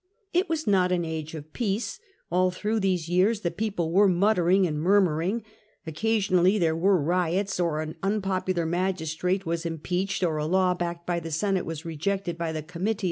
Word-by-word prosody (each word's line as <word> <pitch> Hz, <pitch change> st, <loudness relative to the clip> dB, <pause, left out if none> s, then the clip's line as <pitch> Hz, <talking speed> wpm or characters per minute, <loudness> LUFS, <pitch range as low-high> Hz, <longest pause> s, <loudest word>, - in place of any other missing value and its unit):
It 360 Hz, +1 st, +2 dB
was 320 Hz, -1 st, -1 dB
not 185 Hz, -3 st, +3 dB
an 175 Hz, -2 st, +1 dB
age 160 Hz, -1 st, -5 dB
of 155 Hz, 0 st, -10 dB
peace: 220 Hz, -1 st, -2 dB, 0.3 s
all 185 Hz, +1 st, +3 dB
through 210 Hz, +5 st, -1 dB
these 185 Hz, -4 st, 0 dB
years 190 Hz, +5 st, +2 dB
the 170 Hz, -, -1 dB
people 195 Hz, -7 st, -2 dB
were 200 Hz, +4 st, +5 dB
muttering 185 Hz, 0 st, +3 dB
and 150 Hz, -3 st, -2 dB
murmuring; 190 Hz, +3 st, +2 dB, 0.4 s
occasionally 190 Hz, +2 st, +2 dB
there 165 Hz, -4 st, +2 dB
were 185 Hz, +3 st, +3 dB
riots, 180 Hz, +5 st, 0 dB
or 165 Hz, -3 st, 0 dB
an 155 Hz, 0 st, -5 dB
unpopular 190 Hz, -3 st, 0 dB
magistrate 180 Hz, +1 st, -1 dB
was 165 Hz, 0 st, -2 dB
im 165 Hz, -1 st, -3 dB
peached, 185 Hz, +4 st, -2 dB
or 160 Hz, -3 st, +1 dB
a 150 Hz, 0 st, -1 dB
law 185 Hz, +1 st, +3 dB
backed 170 Hz, -1 st, -4 dB
by 175 Hz, -1 st, 0 dB
the 165 Hz, 0 st, -7 dB
Senate 190 Hz, +4 st, 0 dB
was 165 Hz, 0 st, -5 dB
rejected 175 Hz, +2 st, -2 dB
in 165 Hz, -1 st, -1 dB
the 155 Hz, -, -3 dB
Comitia. 185 Hz, +6 st, -2 dB
180 Hz, 185 wpm, -26 LUFS, 165-195 Hz, 0.4 s, were